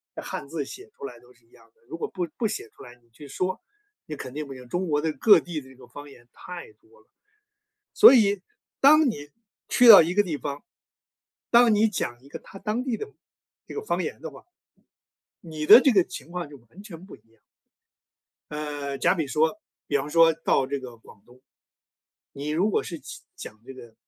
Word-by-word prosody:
那 - - -7
汉 - - -7
字 155 -1 -4
写 390 - -12
出 - - -16
来 120 -3 -10
都 125 +1 -22
是 120 -1 -31
一 115 - -34
样 115 0 -22
的。 - - -36
如 165 - -7
果 - - -4
不 180 -2 -4
不 225 - 0
写 405 - -6
出 - - -17
来， 120 -2 -13
你 120 - -32
去 145 +6 -14
说， 185 +6 -3 0.5
你 155 - -7
肯 130 -2 -9
定 150 0 -6
不 135 - -9
行， 125 -1 -13
中 180 +4 -2
国 150 -1 0
的 160 - -1
各 200 +2 +5
地 170 -3 -6
的 130 - -15
这 130 - -17
个 125 -1 -17
方 145 +4 -12
言 120 -3 -18
太 180 - -10
多 415 +8 -26
了。 - - -32 0.9
所 425 - +8
以， 205 -5 +3 0.4
当 300 0 +6
你 145 -7 -7 0.4
去 245 -1 +5
到 205 -6 +11
一 165 +2 -1
个 205 +2 +3
地 160 -6 -4
方， 140 0 -6 0.9
当 235 -2 +5
你 210 +2 +3
讲 120 - -5
一 140 - -18
个， - - -7
他 195 - -14
当 215 +5 -3
地 250 -4 -2
的 430 - -6 0.6
这 - - -10
个 430 - -5
方 - - -2
言 - - -5
的 - - -6
话， - - -16 1.0
你 155 -3 -6
的 255 - +9
这 275 - +4
个 195 -5 +4
情 170 - -11
况 175 -4 -5
就 145 - -13
完 190 +9 -15
全 185 -4 -12
不 195 - -14
一 - - -30
样。 - - -34 1.3
呃， 145 -2 -5
假 - - +2
比 165 -5 -2
说 160 +9 0 0.3
比 145 - -2
方 140 +2 -5
说 165 0 +5
到 145 -4 0
这 140 0 -3
个 125 -3 -11
广 105 -2 -19
东， 125 +1 -21 0.9
你 145 +2 -7
如 180 +8 0
果 - - 0
是 170 - -7
讲 135 - -11 0.2
讲 110 - -11
这 - - -9
个 120 -3 -14
155 Hz, 240 characters per minute, -25 LUFS, 140-205 Hz, 1.3 s, 到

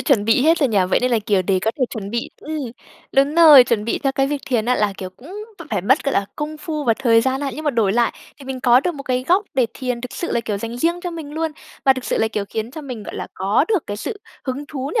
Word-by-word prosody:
chuẩn 235 -9 +2
bị 225 +3 +3
hết 325 +3 +4
rồi 280 -4 +2
nhỉ? 210 - +2
Vậy - - +3
nên 250 0 +1
là, 230 - +3
kiểu, 195 -3 +2
để 190 0 +1
có 220 - +2
thể 255 - +3
chuẩn 200 -3 -6
bị 235 0 -3
ừm, 310 +1 -5 0.5
đúng 275 +3 +3
rồi, 305 -6 +9
chuẩn 225 -3 0
bị 230 - -1
theo 275 -2 0
cái 270 0 +1
việc 285 0 -3
thiền 240 -5 0
á 250 +2 +2
là, 205 -1 +1
kiểu, 185 -1 -6
cũng 255 - -15 0.4
phải 205 -4 0
mất, 265 +9 +3
gọi 275 - 0
là, 200 - +1
công 305 +1 -4
phu 305 -1 -4
và 230 - +3
thời 230 -4 +4
gian 265 +2 0
ha. 280 -1 -2
Nhưng 310 - -7
mà 295 - +2
đổi 220 -6 +1
lại 235 0 +2 0.3
thì 275 - -12
mình 260 -1 -5
có 245 0 +5
được 345 +2 -2
một 275 - -7
cái 255 -1 -1
góc 380 +4 +4
để 255 -3 +3
thiền 250 -2 -3
thực 250 0 -7
sự 345 - -4
là, - - +1
kiểu, 210 -3 -3
dành 230 +2 -5
riêng 340 +6 +1
cho 355 -1 -4
mình 320 -4 -7
luôn, 320 +1 -2 0.3
mà 265 - +7
thực 260 -1 -7
sự - - -1
là, 220 - +2
kiểu, 210 -2 -3
khiến 220 +2 -4
cho 310 - -8
mình, 250 -6 -7
gọi - - -8
là, - - -5
có 200 +8 +2
được 410 -8 0
cái 205 - -4
sự 410 - -5 0.2
hứng 275 +2 -4
thú 275 -2 -5
nhỉ? 440 - +3
255 Hz, 305 wpm, -20 LUFS, 225-295 Hz, 0.5 s, rồi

